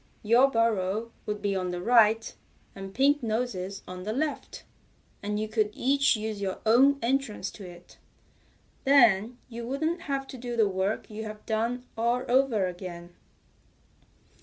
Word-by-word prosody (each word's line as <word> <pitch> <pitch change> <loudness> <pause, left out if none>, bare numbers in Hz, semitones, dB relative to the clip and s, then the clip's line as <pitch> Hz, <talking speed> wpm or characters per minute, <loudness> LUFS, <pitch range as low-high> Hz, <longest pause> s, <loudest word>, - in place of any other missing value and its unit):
"Your 240 +5 +5
burrow 225 -2 0 0.2
would 210 -1 -4
be 200 -1 0
on 185 -1 -2
the 180 0 -3
right, 225 +1 +4 0.4
and 195 0 -8
Pink 280 +7 +3
Nose's 215 -5 -3
on 180 0 -7
the 210 +4 -3
left, 300 +4 -3 0.6
and 210 +1 -2
you 215 - -2
could 215 -1 +1
each 275 +1 +3
use 215 -1 -4
your 190 -1 -2
own 265 +6 +5
entrance 235 -6 -1
to 200 - -11
it. 175 0 -15 0.8
Then 240 -4 +4
you 235 -1 -7
wouldn't 315 +6 -1
have 275 -4 -3
to 260 - -8
do 240 0 -5
the 220 -2 +4
work 190 +2 -2
you've 215 0 -7
done 230 +3 -1
all 235 +2 0
over 245 -6 +2
again." 175 -1 -7
220 Hz, 150 wpm, -27 LUFS, 200-250 Hz, 0.8 s, Your